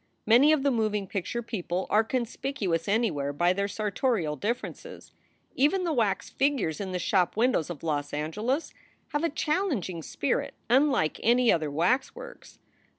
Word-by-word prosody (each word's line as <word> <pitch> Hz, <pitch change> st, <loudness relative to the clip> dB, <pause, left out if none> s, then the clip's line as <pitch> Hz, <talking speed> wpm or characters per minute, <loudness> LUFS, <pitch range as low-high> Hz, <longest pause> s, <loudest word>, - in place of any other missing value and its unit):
Many 245 Hz, +7 st, +6 dB
of 305 Hz, -3 st, +2 dB
the 280 Hz, -, +3 dB
moving 215 Hz, -4 st, 0 dB
picture 200 Hz, +5 st, -3 dB
people 185 Hz, -4 st, -3 dB
are 215 Hz, +2 st, +5 dB
conspicuous 225 Hz, -, -2 dB
anywhere 195 Hz, -10 st, 0 dB
by 175 Hz, +5 st, +2 dB
their 200 Hz, +1 st, -1 dB
sartorial 210 Hz, -, -1 dB
differences. 230 Hz, -, -5 dB, 0.4 s
Even 300 Hz, +8 st, +2 dB
the 335 Hz, -3 st, 0 dB
wax 215 Hz, -7 st, 0 dB
figures 265 Hz, -, 0 dB
in 190 Hz, -2 st, -4 dB
the 180 Hz, -, -1 dB
shop 180 Hz, +1 st, +1 dB
windows 230 Hz, -, +2 dB
of 165 Hz, -4 st, -7 dB
Los 145 Hz, -3 st, -2 dB
Angeles 210 Hz, -, -2 dB, 0.4 s
have 295 Hz, +2 st, -2 dB
a 335 Hz, -, +2 dB
challenging 300 Hz, -, -1 dB
spirit 140 Hz, -, -2 dB, 0.2 s
unlike 265 Hz, -, +3 dB
any 240 Hz, +1 st, +4 dB
other 155 Hz, -3 st, 0 dB
waxworks. 260 Hz, -, -2 dB
215 Hz, 150 wpm, -27 LUFS, 175-265 Hz, 0.4 s, Many